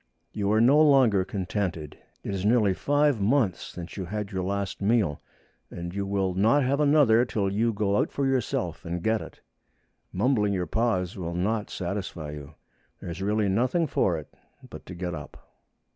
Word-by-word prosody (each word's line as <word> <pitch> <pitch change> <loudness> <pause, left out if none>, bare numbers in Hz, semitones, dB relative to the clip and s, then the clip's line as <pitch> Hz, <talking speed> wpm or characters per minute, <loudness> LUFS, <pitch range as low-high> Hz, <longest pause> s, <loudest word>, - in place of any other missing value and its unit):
You 100 -1 -1
are 110 - +3
no 135 +7 +5
longer 130 -10 +5
contented. 90 -5 -3 0.3
It - - -4
is 95 -1 -3
nearly 105 -2 +3
five 145 +1 +1
months 110 -3 +2
since 90 +1 -8
you 95 - -3
had 105 +2 -4
your 95 -2 -2
last 100 +1 -3
meal, 100 -7 +1 0.5
and 85 0 -7
you 100 0 -3
will 95 -2 0
not 110 +10 +3
have 135 +3 +1
another 140 -6 +5
till 105 -5 -1
you 115 +3 +1
go 100 -1 0
out - - 0
for 140 - -1
yourself 110 - -1
and 85 +1 -4
get 110 0 +1
it. - - -11 0.7
Mumbling 105 -6 +1
your 90 -2 -1
paws 110 -1 -1
will 85 -1 -4
not 105 +4 -1
satisfy 90 -5 -4
you. 75 0 -10 0.4
There 85 - -7
is 85 - -7
really 105 +1 +1
nothing 125 - +1
for 95 - +1
it 75 - -10 0.3
but - - -11
to 90 - -8
get 90 0 -4
up. 75 -3 -8
100 Hz, 180 wpm, -26 LUFS, 90-115 Hz, 0.7 s, no